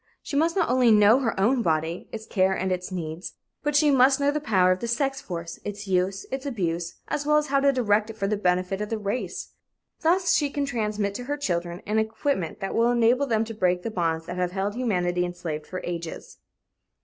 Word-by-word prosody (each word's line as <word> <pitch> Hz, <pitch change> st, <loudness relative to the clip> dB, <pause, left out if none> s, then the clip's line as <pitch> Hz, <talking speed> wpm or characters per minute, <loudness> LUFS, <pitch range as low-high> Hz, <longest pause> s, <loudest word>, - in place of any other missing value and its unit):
She -, -, -5 dB
must 325 Hz, +3 st, +2 dB
not 365 Hz, -4 st, +2 dB
only 250 Hz, -1 st, +4 dB
know 215 Hz, +3 st, +6 dB
her 230 Hz, -7 st, -1 dB
own 240 Hz, +6 st, +3 dB
body, 160 Hz, -2 st, -1 dB
its 220 Hz, 0 st, -6 dB
care 190 Hz, -3 st, +2 dB
and 190 Hz, 0 st, -1 dB
its 180 Hz, +1 st, -3 dB
needs, 165 Hz, -1 st, -5 dB, 0.3 s
but 295 Hz, -1 st, -1 dB
she 295 Hz, 0 st, +5 dB
must 265 Hz, +1 st, +5 dB
know 285 Hz, 0 st, +2 dB
the 300 Hz, -, -1 dB
power 190 Hz, -9 st, +3 dB
of 185 Hz, -, +1 dB
the 235 Hz, -, -3 dB
sex 270 Hz, +3 st, -1 dB
force, 170 Hz, -2 st, -6 dB
its 205 Hz, 0 st, -6 dB
use, 190 Hz, +1 st, 0 dB
its 265 Hz, 0 st, -3 dB
abuse, 175 Hz, -, -2 dB
as 290 Hz, -, -2 dB
well 300 Hz, +1 st, +3 dB
as 300 Hz, -1 st, 0 dB
how 275 Hz, -, +5 dB
to 280 Hz, 0 st, +4 dB
direct 215 Hz, -4 st, +1 dB
it 225 Hz, -, -8 dB
for 200 Hz, -, -1 dB
the 210 Hz, +2 st, +1 dB
benefit 185 Hz, 0 st, 0 dB
of 210 Hz, -, -3 dB
the 225 Hz, -, -1 dB
race. 205 Hz, -2 st, -4 dB, 0.5 s
Thus 350 Hz, +1 st, +3 dB
she 290 Hz, -2 st, +2 dB
can 285 Hz, 0 st, -2 dB
transmit 215 Hz, -6 st, -1 dB
to 245 Hz, +4 st, -6 dB
her 290 Hz, +2 st, -2 dB
children 175 Hz, -8 st, -2 dB
an 215 Hz, +1 st, +1 dB
equipment 220 Hz, -, -2 dB
that 195 Hz, -, -3 dB
will 230 Hz, +1 st, +3 dB
enable 245 Hz, +3 st, +3 dB
them 225 Hz, -2 st, +1 dB
to 225 Hz, -, -7 dB
break 180 Hz, -4 st, +1 dB
the 230 Hz, -, -3 dB
bonds 165 Hz, -4 st, -1 dB
that 180 Hz, +1 st, -6 dB
have 180 Hz, -1 st, -1 dB
held 195 Hz, +1 st, -1 dB
humanity 180 Hz, -7 st, 0 dB
enslaved 175 Hz, -4 st, -5 dB
for 185 Hz, -1 st, -5 dB
ages. 170 Hz, -1 st, -6 dB
210 Hz, 225 wpm, -25 LUFS, 180-255 Hz, 0.5 s, know